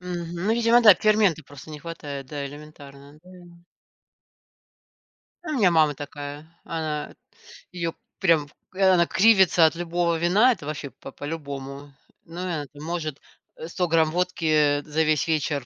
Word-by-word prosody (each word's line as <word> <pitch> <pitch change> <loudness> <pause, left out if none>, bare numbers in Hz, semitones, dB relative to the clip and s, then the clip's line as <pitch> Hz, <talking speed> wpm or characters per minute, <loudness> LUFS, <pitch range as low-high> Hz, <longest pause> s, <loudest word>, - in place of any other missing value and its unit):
Мгм. 175 -2 -6
Ну 220 - +3
видимо, 235 +1 +4
да, 210 -4 +9
ферменты 210 -5 +2
просто 145 +2 -13
не 150 - -8
хватает, 145 -4 -7
да, 145 +1 -5
элементарно, 145 0 -13
да. 180 - -17 2.1
У 315 - -5
меня 215 -11 +3
мама 155 -3 +3
такая. 145 +1 -8 0.2
Она 155 -2 -4 0.6
ее 170 -2 -3 0.3
прям 165 -5 +2 0.3
э, 195 - -4
она 175 -2 +4
кривится 190 -5 +5
от 160 - +2
любого 170 0 -1
вина, 190 +10 +4
это 150 - -5
вообще 145 -2 -5
по 135 - -12
по-любому. 140 -2 -7 0.3
Ну 165 +2 -10
и - - -3
она 160 -5 -3
там 145 +1 -12
может, 160 -4 -4 0.4
э, 160 - -8
100 180 +1 -2
грамм 160 -1 +2
водки, 180 0 -2
э, 150 -2 +3
за 155 +2 -1
весь 155 -2 +1
вечер 150 -4 -1
160 Hz, 155 wpm, -24 LUFS, 145-175 Hz, 2.1 s, да